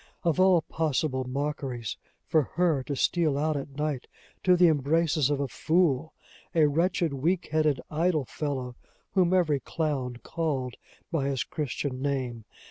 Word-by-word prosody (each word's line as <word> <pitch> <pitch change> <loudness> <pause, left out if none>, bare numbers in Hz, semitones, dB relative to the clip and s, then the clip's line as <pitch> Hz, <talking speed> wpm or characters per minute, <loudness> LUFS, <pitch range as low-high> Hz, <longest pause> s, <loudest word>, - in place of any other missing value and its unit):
Of 170 -1 +1
all 185 -3 +5
possible 145 -4 -1
mockeries, 130 -4 -3 0.3
for 160 - +3
her 170 -6 +2
to 145 - -2
steal 155 0 +2
out 155 +1 +1
at 140 0 -5
night 150 -4 -2 0.4
to 180 -1 +5
the 175 0 +6
embraces 155 0 +2
of 145 -1 0
a 140 - 0
fool! 160 +1 +1 0.4
a 160 -2 +6
wretched, 165 +1 +1
weak 165 +7 0
headed, 155 -4 +2
idle 155 -2 +1
fellow, 130 -3 -4 0.4
whom 185 -3 +3
every 165 -6 +3
clown 140 -6 -2
called 140 -7 -2 0.4
by 145 -5 0
his 135 -2 0
Christian 140 -3 -3
name! 130 -5 -2
150 Hz, 145 wpm, -28 LUFS, 135-165 Hz, 0.4 s, the